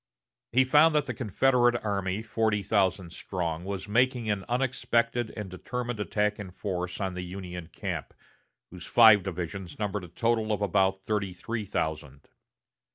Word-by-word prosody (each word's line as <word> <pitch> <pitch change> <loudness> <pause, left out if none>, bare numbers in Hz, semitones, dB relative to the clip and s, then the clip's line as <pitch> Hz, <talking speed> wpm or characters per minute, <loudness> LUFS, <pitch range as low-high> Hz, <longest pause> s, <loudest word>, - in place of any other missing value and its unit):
He 130 +3 +5
found 150 +4 +5
that 150 - +3
the - - -3
Confederate 120 +1 +2
army, 100 0 -1
forty 110 -2 0
thousand 95 -4 +1
strong, 85 -3 -3
was 100 +1 -5
making 120 0 +2
an 100 -2 -2
unexpected 120 -2 0
and 105 -2 -4
determined 120 +5 -5
attack 105 0 0
in 100 -2 -6
force 90 -1 -4
on 95 -2 -2
the 90 - -4
Union 90 -2 -7
camp, - - -5 0.6
whose 90 0 -9
five 110 -4 +7
divisions 90 0 -5
numbered 105 -2 -2
a - - -8
total 110 +4 0
of 105 -1 0
about 95 0 +1
thirty 100 -3 -1
three 110 +3 -4
thousand. 75 -5 -4
105 Hz, 155 wpm, -28 LUFS, 90-115 Hz, 0.6 s, five